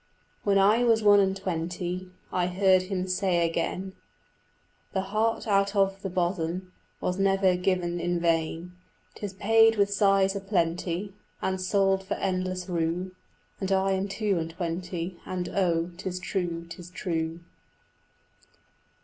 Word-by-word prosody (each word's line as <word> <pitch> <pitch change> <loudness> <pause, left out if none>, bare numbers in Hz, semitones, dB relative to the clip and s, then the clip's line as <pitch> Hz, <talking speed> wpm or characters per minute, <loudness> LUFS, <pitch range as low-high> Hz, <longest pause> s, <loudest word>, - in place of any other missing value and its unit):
When 200 -1 +2
I 210 +5 +5
was 225 -2 +3
one 205 -1 +7
and 195 -1 +2
twenty 180 0 -3 0.2
I 180 -1 +1
heard 185 0 +4
him 185 0 -3
say 185 -2 +1
again, 180 +3 -3 1.0
"The 190 - +1
heart 215 +4 0
out 200 0 +2
of 195 -1 +2
the 195 - -3
bosom 180 0 -2 0.3
Was 180 +1 -2
never 195 -1 +3
given 180 -1 0
in 175 0 0
vain; 165 +1 0 0.4
'Tis 205 -2 -6
paid 225 +3 +5
with 200 -1 +2
sighs 195 -1 +3
a - - -1
plenty 180 0 -1 0.3
And 190 0 -2
sold 195 0 +2
for 190 - -3
endless 185 -1 -2
rue." 175 +1 -1 0.5
And 190 -1 -2
I 195 0 +2
am 190 +1 0
two 200 -2 0
and 160 0 -3
twenty, 175 +1 -4
And 180 -1 -3
oh, 170 -3 +1
'tis 185 -1 -4
true, 175 -3 -3
'tis 175 +1 -10
true. 165 -2 -3
185 Hz, 140 wpm, -27 LUFS, 175-195 Hz, 1.0 s, one